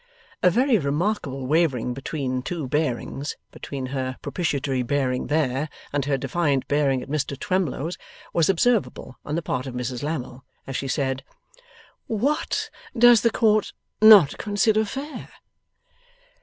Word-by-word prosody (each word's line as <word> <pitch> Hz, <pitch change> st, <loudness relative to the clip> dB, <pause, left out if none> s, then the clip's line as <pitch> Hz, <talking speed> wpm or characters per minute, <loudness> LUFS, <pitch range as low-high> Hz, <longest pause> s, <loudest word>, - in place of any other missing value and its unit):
A 180 Hz, -, +6 dB
very 245 Hz, +4 st, +3 dB
remarkable 145 Hz, -2 st, -1 dB
wavering 135 Hz, -5 st, +1 dB
between 130 Hz, -1 st, -3 dB
two 155 Hz, +1 st, -4 dB
bearings 145 Hz, 0 st, -2 dB
between 135 Hz, -2 st, -6 dB
her 130 Hz, -1 st, -3 dB
propitiatory 140 Hz, -6 st, -1 dB
bearing 130 Hz, 0 st, -1 dB
there, 145 Hz, -1 st, 0 dB, 0.2 s
and 145 Hz, -2 st, 0 dB
her 140 Hz, -1 st, +1 dB
defiant 140 Hz, 0 st, 0 dB
bearing 140 Hz, -3 st, +1 dB
at -, -, -11 dB
Mr 140 Hz, -1 st, -2 dB
Twemlow's 175 Hz, -3 st, -2 dB, 0.3 s
was 165 Hz, 0 st, +2 dB
observable 195 Hz, -, 0 dB
on 150 Hz, -, -3 dB
the 170 Hz, -, -2 dB
part 130 Hz, -2 st, -2 dB
of 125 Hz, -, -6 dB
Mrs 125 Hz, 0 st, -3 dB
Lammle 135 Hz, -4 st, -4 dB, 0.2 s
as 135 Hz, -, -6 dB
she 135 Hz, -, -2 dB
said: 135 Hz, -1 st, -1 dB, 0.8 s
'What 255 Hz, +8 st, -1 dB, 0.3 s
does 240 Hz, -1 st, +7 dB
the 235 Hz, -, +4 dB
Court 215 Hz, -2 st, +2 dB, 0.3 s
not 210 Hz, -9 st, +8 dB
consider 215 Hz, +1 st, +2 dB
fair? 275 Hz, +8 st, -6 dB
145 Hz, 135 wpm, -24 LUFS, 130-185 Hz, 0.8 s, not